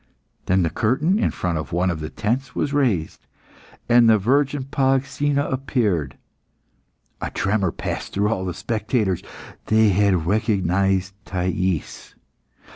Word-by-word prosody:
Then 95 0 +3
the 85 - 0
curtain 150 - +1
in - - +2
front 85 -3 -2
of 80 - -6
one 90 +2 +1
of 80 - -4
the 75 0 -5
tents 125 +7 -2
was 140 - -1
raised, 120 - 0 0.6
and 120 -1 +6
the 110 - +6
virgin 135 +6 +1
Polyxena 135 +2 0
appeared. 110 - -1 1.0
A - - -2
tremor 95 -3 0
passed - - -5
through 100 +1 +1
all 100 -4 -1
the 90 - -4
spectators. 110 -4 -1 0.5
They 110 0 +4
had 95 -3 +2
recognised 95 -1 +1
Thais. 90 -2 -2
105 Hz, 130 wpm, -22 LUFS, 90-130 Hz, 1.0 s, and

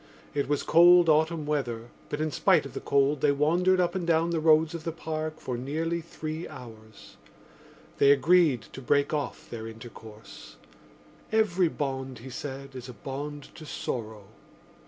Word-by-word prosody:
It 140 -1 -1
was 145 - 0
cold 175 0 +6
autumn 160 0 +2
weather 120 -6 -2 0.2
but 145 - -3
in 155 0 -1
spite 185 -2 +3
of - - -9
the - - -4
cold 140 +1 +1
they 145 - +4
wandered 175 +6 +2
up 175 -1 +1
and 180 -3 -3
down 165 0 +2
the 165 - 0
roads 160 +1 +4
of 165 -2 -6
the 165 - -2
Park 155 -1 -5
for 125 -2 -4
nearly 165 +6 -2
three 160 0 -6
hours. 110 -3 -13 0.8
They 140 - +6
agreed 145 - +4
to 135 - -8
break 140 +4 +1
off 145 -4 -3
their 115 -1 -7
intercourse: 110 -1 -12 0.8
every 200 -5 +2
bond, 135 -4 -4
he 125 +3 -10
said, 135 +1 -7
is 125 0 -8
a - - -8
bond 140 +5 -7
to 160 - -11
sorrow. 110 -7 -5
150 Hz, 165 wpm, -27 LUFS, 130-165 Hz, 0.8 s, cold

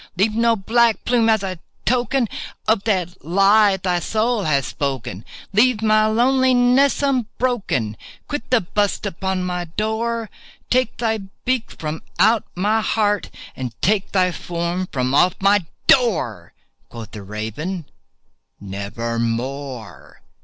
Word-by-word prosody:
Leave 210 +3 +2
no 230 0 +3
black 230 +2 +2
plume 235 -2 +3
as 220 -2 +3
a 185 -3 -4 0.3
token 250 +1 +1 0.4
of 215 -1 +2
that 185 -4 -1
lie 195 +4 +4
thy 180 -1 0
soul 220 +3 0
hath 140 -4 +2
spoken! 130 -7 -4 0.3
Leave 220 +1 +3
my 215 0 +4
loneliness 255 +3 +3
unbroken!—quit 245 - -2
the 250 -3 +4
bust 205 +3 -1
above 190 0 -2
my 180 -1 -2
door! 220 +5 -2 0.4
Take 255 -2 +1
thy 225 -2 0 0.3
beak 255 -3 0
from 155 0 -4 0.2
out 215 +4 +4
my 210 +5 +1
heart, 210 -1 0 0.3
and 120 -3 -6
take 200 +1 +1
thy 185 -2 +2
form 175 +1 -3
from 130 -1 -1
off 180 +6 +4
my 195 -3 +3 0.2
door!" 155 - +2 0.4
Quoth 115 -2 -9
the 105 - -8
Raven, 110 - -5 0.7
"Nevermore." 115 +4 -4
195 Hz, 125 wpm, -21 LUFS, 150-230 Hz, 0.7 s, lie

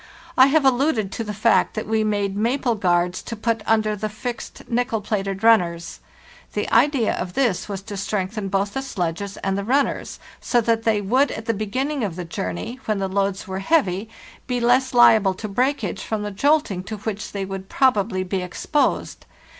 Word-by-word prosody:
I 260 -1 +7
have 290 0 +3
alluded 250 -6 +2
to 230 - -3
the 210 - -5
fact 215 +2 +2
that 215 - -3
we 220 0 +1
made 205 -2 -1
maple 240 +4 +1
guards 180 -3 +1
to 230 - -6
put 225 0 -1
under 215 -1 +2
the 215 +1 -3
fixed 235 +3 -7
nickel 240 -1 0
plated 195 -1 -3
runners. 175 -7 +2 0.5
The - - -1
idea 275 -7 +3
of 180 0 -4
this 235 -8 0
was 195 -1 -5
to 205 0 -7
strengthen 200 +1 -2
both 195 +1 -1
the 270 - -2
sledges 195 -5 -3
and 195 0 0
the 200 - -2
runners, 270 +6 0 0.2
so 245 - +1
that 225 0 0
they 215 -2 +2
would 255 +8 +2
at 220 - -6
the 230 - +1
beginning 255 +7 -2
of 190 -6 -2
the 180 -1 -5
journey, 130 - -5
when 215 -1 0
the 195 0 -1
loads 195 0 -1
were 190 0 -4
heavy, 200 - +1 0.4
be 250 -1 -1
less 250 +2 +3
hable 220 -5 +5
to 215 - -5
breakage 215 -3 -1
from 215 -2 -3
the 210 - -4
jolting 275 -4 +1
to 215 - -5
which 215 0 -5
they 195 -1 -3
would 190 0 -7
probably 205 -7 +2
be 185 0 -2
exposed. 180 - -1
215 Hz, 190 wpm, -22 LUFS, 195-240 Hz, 0.5 s, I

